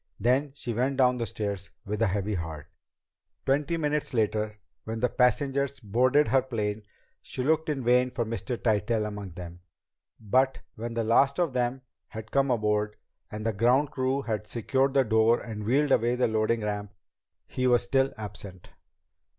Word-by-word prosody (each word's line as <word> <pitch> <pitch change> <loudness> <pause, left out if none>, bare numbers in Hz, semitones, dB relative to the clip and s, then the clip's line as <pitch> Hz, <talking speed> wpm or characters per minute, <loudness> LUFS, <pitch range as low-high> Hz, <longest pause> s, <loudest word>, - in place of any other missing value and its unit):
Then 135 +4 +1
she 120 -4 -4
went 130 +4 0
down 125 -2 +3
the 115 - -1
stairs 100 -3 -4 0.2
with 105 +2 -3
a 115 - +4
heavy 100 +2 -1
heart. 80 -5 -5 0.8
Twenty 145 +5 +1
minutes 150 -4 -1
later, 110 -1 0 0.3
when 110 0 -4
the 125 +1 +2
passengers 135 +2 +1
boarded 130 +7 +2
her 135 0 +4
plane, 110 -5 -3 0.4
she 130 - -4
looked 160 +3 +1
in 140 -4 -2
vain 125 +1 +4
for 120 -2 -2
Mr. 115 +2 -3
Tytell 110 0 +1
among 105 -4 -6
them. 85 0 -9 0.6
But 130 +5 +1
when 115 +1 -6
the 115 - 0
last 135 +5 +3
of 170 -6 +1
them 125 +1 -1 0.2
had 110 -1 -9
come 140 0 +2
aboard, 105 -3 +1 0.3
and 110 +1 -6
the 115 - +1
ground 125 +7 +3
crew 130 +1 -1
had 110 -3 -3
secured 130 +5 0
the 135 - +5
door 110 0 +3
and 105 -3 -6
wheeled 140 +5 +2
away 120 0 +3
the 125 - +2
loading 110 +1 +1
ramp, 105 -1 -4 0.5
he 130 0 -1
was 120 -1 +4
still 135 +2 +2
absent. 100 -3 -8
120 Hz, 170 wpm, -27 LUFS, 105-130 Hz, 0.8 s, the